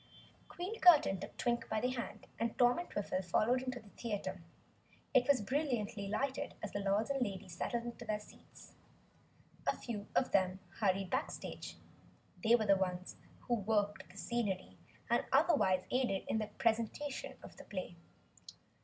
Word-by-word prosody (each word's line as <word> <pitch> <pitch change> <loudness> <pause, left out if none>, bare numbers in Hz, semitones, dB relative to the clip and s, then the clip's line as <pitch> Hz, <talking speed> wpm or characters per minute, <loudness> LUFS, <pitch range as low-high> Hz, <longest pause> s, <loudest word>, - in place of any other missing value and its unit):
Queen 375 +6 -5
Curtain 300 - +7
took - - -8
Twink 235 -1 0
by 220 - +1
the 250 +3 +1
hand, 245 -2 -5
and 230 0 -1
Tom 245 +2 +5
and 350 - -5
Twiffle 195 -2 -2
followed 220 +8 +2
into 255 -1 -3
the 215 -3 -16
theater. 215 -4 -4 0.7
It 250 -1 +5
was 280 -5 +5
brilliantly 235 -6 -1
lighted 260 +7 -1
as 215 - -3
the 205 - -2
Lords 200 +5 +1
and 275 -1 0
Ladies 190 -5 -3
settled 235 +6 -1
into 240 0 -6
their 215 -1 -1
seats. 210 - -16 0.9
A - - +2
few 210 -4 -5
of 260 - +3
them 190 -1 +2 0.2
hurried 195 -3 +1
backstage - - -3 0.7
they 230 +1 +7
were 220 -2 +1
the 200 -1 +6
ones 185 -1 -2 0.3
who 245 - -1
worked 205 -4 0
the 185 - -14
scenery 205 -5 -2 0.3
and - - +3
otherwise 190 - +4
aided 245 -7 +1
in 220 - +1
the 215 - -2
presentation 250 +5 -1
of - - -11
the - - -10
play. 185 -3 -5
220 Hz, 165 wpm, -35 LUFS, 195-250 Hz, 0.9 s, Curtain